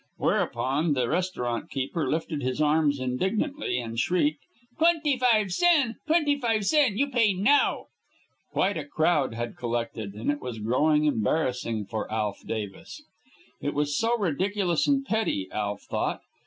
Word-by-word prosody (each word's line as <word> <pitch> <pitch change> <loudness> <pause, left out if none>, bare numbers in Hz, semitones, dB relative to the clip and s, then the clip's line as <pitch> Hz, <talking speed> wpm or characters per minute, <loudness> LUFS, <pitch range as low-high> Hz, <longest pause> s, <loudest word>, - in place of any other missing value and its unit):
Whereupon 140 +6 0
the 125 -3 0
restaurant 155 -9 -2
keeper 135 +5 -2
lifted 160 -2 -2
his 130 +1 -2
arms 150 -2 +2
indignantly 190 - -1
and 115 -2 -4
shrieked: 180 - +1 0.4
"Twenty 320 -3 +3
five 220 -6 +3
sen! 295 - +3
Twenty 300 -3 +2
five 225 -5 0
sen! 275 -6 +3
You 280 +3 +1
pay 225 -6 +3
now!" 270 +10 +3 0.7
Quite 195 -1 +1
a 155 - -3
crowd 150 -4 +1
had 120 0 -4
collected, 115 -4 -4
and 110 +6 -1
it 145 - -5
was 125 -3 -5
growing 150 +8 +2
embarrassing 125 -4 0
for 110 +1 -5
Alf 105 -2 -2
Davis. 110 - -6 0.6
It 145 - -2
was 145 0 0
so 230 +5 +1
ridiculous 190 - 0
and 275 -1 +2
petty, 220 - -1
Alf 105 -1 -3
thought. - - -2
155 Hz, 145 wpm, -26 LUFS, -, 0.7 s, Twenty